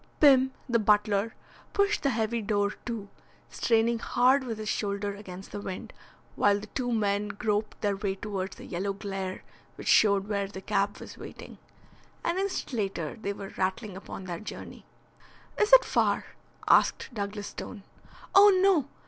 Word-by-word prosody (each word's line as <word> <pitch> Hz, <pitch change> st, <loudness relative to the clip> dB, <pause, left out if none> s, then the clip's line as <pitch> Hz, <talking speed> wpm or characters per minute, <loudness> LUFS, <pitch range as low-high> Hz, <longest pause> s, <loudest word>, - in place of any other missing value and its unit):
Pim, 265 Hz, -3 st, +6 dB, 0.2 s
the 235 Hz, -2 st, +2 dB
butler, 210 Hz, 0 st, +2 dB, 0.4 s
pushed 400 Hz, +1 st, +2 dB
the 280 Hz, -, +2 dB
heavy 225 Hz, -1 st, 0 dB
door 205 Hz, -1 st, +1 dB, 0.2 s
to, 225 Hz, -4 st, -4 dB, 0.4 s
straining 230 Hz, 0 st, +2 dB
hard 255 Hz, +4 st, +3 dB
with 230 Hz, -4 st, -4 dB
his 215 Hz, 0 st, -6 dB
shoulder 200 Hz, -1 st, -1 dB
against 195 Hz, -2 st, -10 dB
the 205 Hz, -, -5 dB
wind, 190 Hz, -2 st, -6 dB, 0.4 s
while 205 Hz, 0 st, +4 dB
the 205 Hz, -, -8 dB
two 245 Hz, +3 st, -3 dB
men 205 Hz, -2 st, +1 dB
groped 210 Hz, +1 st, -2 dB
their 205 Hz, -2 st, +1 dB
way 195 Hz, -1 st, -2 dB
towards 195 Hz, -1 st, -4 dB
the -, -, -11 dB
yellow 195 Hz, +3 st, -2 dB
glare 195 Hz, -2 st, -5 dB, 0.3 s
which -, -, -9 dB
showed 200 Hz, -2 st, +5 dB
where 200 Hz, -2 st, -1 dB
the 195 Hz, -1 st, -8 dB
cab 200 Hz, +1 st, 0 dB
was -, -, -11 dB
waiting. -, -, -10 dB, 0.6 s
An 340 Hz, +2 st, 0 dB
instant 390 Hz, -7 st, -2 dB
later 195 Hz, -8 st, -2 dB
they 200 Hz, -, -2 dB
were 195 Hz, -1 st, -8 dB
rattling 190 Hz, +2 st, -2 dB
upon 195 Hz, 0 st, -8 dB
their 175 Hz, -2 st, -5 dB
journey. 215 Hz, -, -9 dB, 0.7 s
"Is 425 Hz, +2 st, +3 dB
it -, -, +9 dB
far?" -, -, +1 dB, 0.4 s
asked -, -, +4 dB
Douglas 205 Hz, -1 st, -4 dB
Stone. 205 Hz, -5 st, -8 dB, 0.5 s
"Oh, 405 Hz, +1 st, +9 dB
no. 370 Hz, -8 st, +4 dB
210 Hz, 160 wpm, -28 LUFS, 200-235 Hz, 0.7 s, it